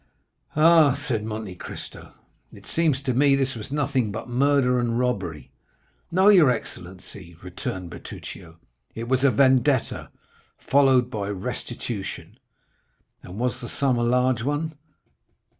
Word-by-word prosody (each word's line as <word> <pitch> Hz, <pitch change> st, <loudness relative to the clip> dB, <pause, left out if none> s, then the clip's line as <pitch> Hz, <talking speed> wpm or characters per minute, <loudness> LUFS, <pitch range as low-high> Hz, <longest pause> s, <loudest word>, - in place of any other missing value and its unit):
"Ah," 155 Hz, -3 st, +6 dB
said 115 Hz, -6 st, -1 dB
Monte 110 Hz, -3 st, -5 dB
Cristo 90 Hz, -, -10 dB, 0.4 s
"it -, -, -15 dB
seems 155 Hz, -5 st, +1 dB
to 130 Hz, -2 st, 0 dB
me 140 Hz, +2 st, +4 dB
this 135 Hz, -1 st, 0 dB
was 110 Hz, +2 st, -8 dB
nothing 140 Hz, -6 st, 0 dB
but 110 Hz, -, -6 dB
murder 125 Hz, 0 st, +2 dB
and 120 Hz, -1 st, 0 dB
robbery." 95 Hz, -, -2 dB, 0.6 s
"No, 190 Hz, +3 st, +4 dB
your 175 Hz, -9 st, +7 dB
excellency," 95 Hz, -5 st, -6 dB
returned 90 Hz, -1 st, -6 dB
Bertuccio; 85 Hz, 0 st, -10 dB, 0.4 s
"it 115 Hz, +1 st, -5 dB
was 130 Hz, +1 st, +1 dB
a 140 Hz, -, +6 dB
vendetta 130 Hz, +1 st, +2 dB, 0.5 s
followed 130 Hz, -3 st, +3 dB
by 105 Hz, -4 st, -3 dB
restitution." 100 Hz, +1 st, -5 dB, 0.8 s
"And 90 Hz, +2 st, -10 dB
was 125 Hz, +2 st, -1 dB
the 120 Hz, -, -6 dB
sum 130 Hz, -3 st, +1 dB
a -, -, +1 dB
large 125 Hz, 0 st, +2 dB
one?" 145 Hz, +5 st, -2 dB
125 Hz, 130 wpm, -24 LUFS, 105-140 Hz, 0.8 s, your